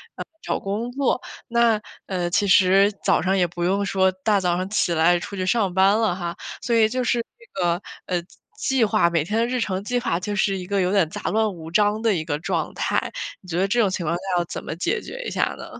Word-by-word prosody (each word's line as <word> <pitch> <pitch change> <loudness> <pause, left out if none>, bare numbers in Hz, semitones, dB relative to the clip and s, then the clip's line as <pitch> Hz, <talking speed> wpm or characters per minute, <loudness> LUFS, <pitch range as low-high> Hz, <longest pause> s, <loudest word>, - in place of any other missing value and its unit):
呃， - - -6 0.2
找 - - -1
工 215 +5 -3
作。 265 -1 0 0.3
那， 235 -2 +3 0.3
呃， 180 -2 -1
其 190 +4 +2
实 195 +1 +5
早 - - +3
上 190 +1 +1
也 180 -2 +3
不 175 0 -5
用 195 +3 +1
说 190 -1 +2
大 195 +2 +1
早 175 -1 +1
上 185 +1 -3
起 195 -4 +1
来 170 +2 +4
出 200 - -7
去 185 - -1
上 200 -2 +1
班 190 +3 +4
了 220 -5 +2
哈， 175 -2 -4 0.3
所 235 - 0
以 220 -1 +5
就 255 +2 -1
是 240 0 +1 0.2
这 475 - -8
个， 175 +1 +1 0.3
呃， 180 -1 0 0.4
计 265 -4 +2
划 215 -5 +3
每 165 -3 +1
天 210 +6 -1
的 230 - +3
日 250 +1 -1
程 195 -4 -2
计 245 +4 0
划 240 -9 -1
就 205 +3 -4
是 195 0 +1
一 180 - -6
个 200 +1 0
有 180 0 +1
点 190 -6 +3
杂 - - -7
乱 215 -1 +1
无 160 -2 -9
章 210 +3 +2
的 225 -3 +2
一 160 - -2
个 150 -2 -2
状 160 - -2
态。 - - -1 0.3
你 185 - -15
觉 170 - -2
得 195 - +2
这 240 +4 +1
种 205 - +3
情 185 -2 -3
况 170 +2 0
下 175 - -5 0.2
要 175 - +1
怎 - - -6
么 - - -4
解 395 - -1
决 - - -7
一 - - -4
下 - - 0
呢？ - - -8
195 Hz, 275 characters per minute, -23 LUFS, 175-220 Hz, 0.4 s, 实